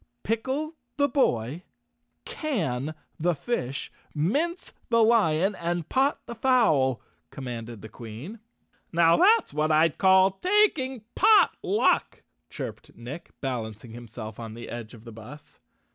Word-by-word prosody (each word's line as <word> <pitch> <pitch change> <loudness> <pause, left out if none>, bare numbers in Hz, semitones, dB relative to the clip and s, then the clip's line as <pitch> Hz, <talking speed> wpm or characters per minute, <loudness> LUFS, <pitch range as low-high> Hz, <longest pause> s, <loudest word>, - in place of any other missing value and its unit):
" 120 - -50
Pickle 265 +8 -2 0.2
the 285 -1 +3
boy, 145 - 0 0.6
Can 155 - -2 0.2
the 175 +1 +1
fish, 140 - -3 0.2
Mince 290 - -1 0.2
the 230 -1 +4
lion 200 -5 +3
And 170 -2 -3
pot 270 +2 +1
the - - -6
fowl." 220 - +2 0.3
commanded 120 -3 -7
the - - -7
Queen. 115 - -9 0.5
"Now 165 0 +5
that's 435 +5 +4
what 155 +1 0
I'd 155 0 +3
call 190 0 +4
taking 320 - +2
pot 435 -2 +6
luck," 415 - +1 0.3
chirped - - -8
Nick, 140 +9 -8
balancing 115 -4 -5
himself 110 -2 -9
on 115 -1 -7
the 120 - -9
edge 120 0 -7
of 110 - -15
the 115 - -10
bus. 115 +7 -12
165 Hz, 130 wpm, -26 LUFS, -, 0.6 s, pot